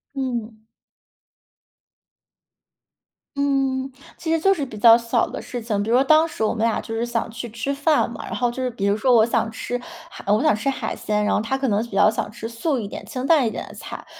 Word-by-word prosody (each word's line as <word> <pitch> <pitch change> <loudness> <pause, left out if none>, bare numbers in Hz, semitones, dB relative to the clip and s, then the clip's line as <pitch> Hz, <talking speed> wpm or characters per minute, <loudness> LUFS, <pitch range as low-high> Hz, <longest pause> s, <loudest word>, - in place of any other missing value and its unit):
嗯。 235 -5 -4 2.7
嗯， 270 -1 0 0.2
其 325 - -4
实 325 - +2
就 390 +4 +4
是 300 -6 -3
比 225 -5 -7
较 230 +2 +8
小 230 -1 +1
的 - - -6
事 245 - -6
情。 215 -3 -2
比 215 - -3
如 240 - +4
说 265 - +5
当 310 +3 +5
时 265 - -4
我 215 - +1
们 225 -1 -2
俩 230 - +1
就 225 - -7
是 225 +1 -1
想 235 -1 -2
去 235 +1 -6
吃 235 +5 -3
饭 290 +2 +2
嘛， - - -7
然 - - -5
后 245 -1 0
就 260 - -5
是 255 - 0
比 215 -4 -4
如 200 +1 +3
说 245 +3 +3
我 220 -1 +6
想 230 -1 0
吃 245 +2 -4 0.3
海 - - -10
我 210 - +3
想 210 - +4
吃 275 +6 -1
海 250 -4 -3
鲜， 210 0 -1
然 - - +1
后 - - +2
他 265 +4 -1
可 270 -1 -1
能 210 0 +2
比 235 - -14
较 215 - +5
想 210 -1 -3
吃 225 - -6
素 255 +5 -1
一 210 -4 -4
点， - - -8
清 255 -2 -4
淡 285 -6 +4
一 - - +1
点 - - -6
的 - - -11
菜， - - -9
235 Hz, 260 characters per minute, -22 LUFS, 220-270 Hz, 2.7 s, 较